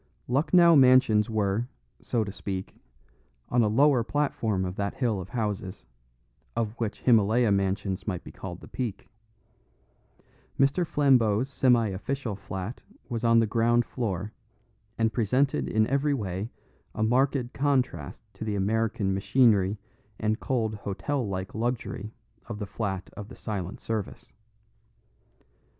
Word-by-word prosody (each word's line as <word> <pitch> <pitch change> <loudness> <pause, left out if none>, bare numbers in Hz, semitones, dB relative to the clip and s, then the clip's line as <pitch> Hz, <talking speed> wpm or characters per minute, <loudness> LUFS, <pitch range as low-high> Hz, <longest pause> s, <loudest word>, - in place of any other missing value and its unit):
Lucknow 170 +6 +5
Mansions 125 -5 +5
were, 110 +1 0 0.3
so 115 -2 0
to 100 - -5
speak, 95 -1 -5 0.7
on 120 - +3
a 110 - +3
lower 130 +3 +4
platform 115 -8 -1
of 90 0 -4
that 100 0 -2
hill 115 -7 0
of 90 - -9
houses, 105 -4 -3 0.7
of 110 -2 -1
which 110 -3 -3
Himylaya 115 -1 +4
Mansions 100 0 -1
might 90 -4 -3
be - - -10
called 90 -2 -8
the - - -11
peak. 120 -6 -5 1.5
Mr. 140 +6 +3
Flambeau's 130 -5 +3
semi 125 -5 +3
official 110 +4 -3
flat 95 +3 -6 0.3
was 120 -2 -3
on 115 0 +5
the 115 - +5
ground 120 +2 +2
floor, 105 -3 -3 0.6
and 115 -1 +1
presented 125 +6 +1
in 110 0 +3
every 140 +4 +1
way 100 -2 -3 0.5
a 110 - 0
marked 125 +2 +1
contrast 130 - -1
to - - -7
the 105 -2 -2
American 105 0 0
machinery 100 -1 +3 0.4
and 110 +1 0
cold 115 -4 -1
hotel 105 +5 -3
like 95 0 -4
luxury 110 -2 -3 0.4
of 115 -2 -5
the 105 - -4
flat 95 -2 -4
of 105 - -7
the - - -11
Silent 100 -4 -5
Service. 110 -3 -5
110 Hz, 135 wpm, -27 LUFS, 100-125 Hz, 1.5 s, Lucknow